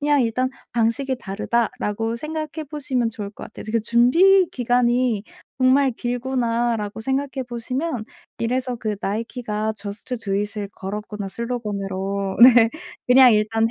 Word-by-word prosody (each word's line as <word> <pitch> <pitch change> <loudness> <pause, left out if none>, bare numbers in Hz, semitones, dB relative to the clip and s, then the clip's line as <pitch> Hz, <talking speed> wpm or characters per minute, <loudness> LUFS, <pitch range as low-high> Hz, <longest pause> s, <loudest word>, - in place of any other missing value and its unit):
그냥 290 -2 +3
일단 255 +3 0 0.2
'방식이 240 +3 0
다르다.'라고 225 +1 -2
생각해 310 +2 -5
보시면 260 -6 -1
좋을 205 -2 -6
것 - - -10
같아요. - - -10
그 230 0 +1
'준비 335 - +5
기간이 245 -2 +1 0.4
정말 260 0 +4
길구나.'라고 235 -3 -1
생각해 265 +2 -2
보시면 250 +2 -3 0.3
이래서 250 +2 -1
그 215 -3 -3
나이키가 220 0 -2
Just 205 +5 -6
do 200 -4 -3
it 205 +1 -2
을 200 -1 -4
걸었구나, 210 +1 -6
슬로건으로. 200 -4 -3
네. 240 -2 +8 0.4
그냥 250 -1 +7
일단 225 +1 +2
235 Hz, 325 characters per minute, -22 LUFS, 210-255 Hz, 0.4 s, 네